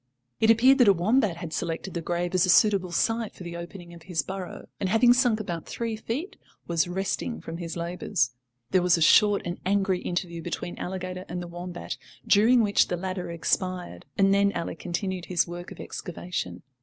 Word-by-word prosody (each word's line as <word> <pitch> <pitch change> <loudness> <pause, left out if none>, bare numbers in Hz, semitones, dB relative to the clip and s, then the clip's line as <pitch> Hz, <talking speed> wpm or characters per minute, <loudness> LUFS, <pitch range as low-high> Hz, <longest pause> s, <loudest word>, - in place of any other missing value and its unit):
It 220 - +3
appeared 255 +5 +6
that 245 - +6
a 200 - +8
wombat 195 +1 +2
had 170 -2 -6
selected 170 +2 -3
the 170 - -3
grave 175 +2 -2
as 185 -1 +4
a - - -1
suitable 190 -1 +4
site 225 +4 0
for - - -10
the 170 -1 -6
opening 170 0 -8
of 170 - -12
his 170 -1 -2
burrow 190 -2 -6
and 190 - -1
after - - 0
having 240 +2 +6
sunk 245 -3 +3
about 175 -6 -5
three 230 -1 -3
feet, 245 - -4 0.3
was 170 -1 +1
resting 195 +6 -2
from 165 - -7
his 170 -1 -5
labours. 170 -5 -1 0.4
There 185 - +4
was 180 0 +4
a - - -3
short 205 +4 +5
and 175 +1 -4
angry 195 -1 +1
interview 175 -1 -3
between 175 +1 -4
Alligator 185 0 -5
and 175 +1 -3
the 175 - -5
wombat, 175 +1 -6 0.3
during 230 +4 +5
which 205 -1 +3
the 175 - -2
latter 185 0 -4
expired, 180 +2 -2
and 195 0 +4
then 200 0 +4
Ally - - -3
continued 180 +1 -3
his 175 -2 +1
work 175 +1 -7
of - - -10
excavation. 175 0 -5
185 Hz, 200 wpm, -26 LUFS, 175-205 Hz, 0.4 s, a